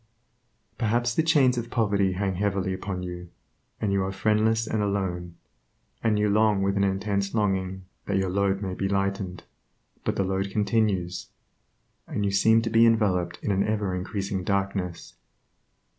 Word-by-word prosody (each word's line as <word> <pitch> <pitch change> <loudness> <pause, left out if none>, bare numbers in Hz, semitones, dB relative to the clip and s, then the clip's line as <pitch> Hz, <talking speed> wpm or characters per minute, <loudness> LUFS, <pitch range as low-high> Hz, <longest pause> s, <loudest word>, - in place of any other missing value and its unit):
Perhaps 120 +1 +1
the 160 - +2
chains 140 -6 +3
of 115 - -6
poverty 100 -4 +1
hang 95 +1 -1
heavily 95 0 -1
upon 95 -1 -4
you, 90 -1 -7 0.5
and 100 -2 0
you 100 -1 +2
are 95 - -2
friendless 110 +3 +2
and 110 -1 -1
alone, 90 -4 -2 0.7
and 110 -2 +2
you 105 0 +2
long 105 -1 +3
with 100 0 +1
an 100 - +2
intense 100 +1 -1
longing 95 -3 -1 0.2
that - - +1
your 95 -1 0
load 100 +1 +1
may 95 -1 -3
be 95 +1 -2
lightened; 95 -2 -2 0.6
but - - -1
the 100 - +1
load 95 +1 -1
continues, 100 -4 0 0.8
and 105 - -2
you 100 - +1
seem 110 +3 +4
to 115 - -1
be 115 0 +5
enveloped 95 -6 +1
in 105 - 0
an 100 0 +2
ever 105 -3 -1
increasing 95 +1 -3
darkness. 95 -2 -2
100 Hz, 160 wpm, -26 LUFS, 95-105 Hz, 0.8 s, be